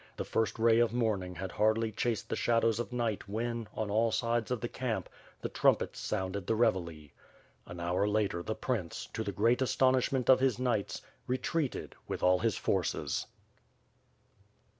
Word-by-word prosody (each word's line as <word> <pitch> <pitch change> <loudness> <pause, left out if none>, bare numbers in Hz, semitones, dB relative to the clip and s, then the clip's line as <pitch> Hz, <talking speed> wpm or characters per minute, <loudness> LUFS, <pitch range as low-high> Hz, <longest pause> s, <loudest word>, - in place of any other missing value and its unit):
The - - -3
first 115 +1 0
ray 115 0 +4
of 120 -1 +3
morning 100 -7 0
had 95 +1 -5
hardly 110 +1 +2
chased 110 -1 -1
the - - -1
shadows 115 -1 +2
of 120 - -3
night 115 -5 -2
when, 115 +1 -2
on 105 -2 -2
all 115 +2 +3
sides 115 -1 0
of 125 -2 -1
the 120 - -2
camp, 115 -7 -3 0.3
the - - -2
trumpets - - +2
sounded 95 0 -3
the 115 - +2
revielle. 85 - 0 0.6
An 85 0 -8
hour 90 +4 +1
later, 105 -4 0
the 110 +5 -3
prince, 110 -10 -3
to - - -2
the - - -3
great 115 +4 +2
astonishment 130 0 +2
of 130 - +7
his 130 -3 +2
knights, 120 -5 -1 0.2
retreated 135 +3 -2
with - - -4
all 90 0 +5
his 115 -1 0
forces. - - -1
115 Hz, 165 wpm, -31 LUFS, 100-120 Hz, 0.6 s, of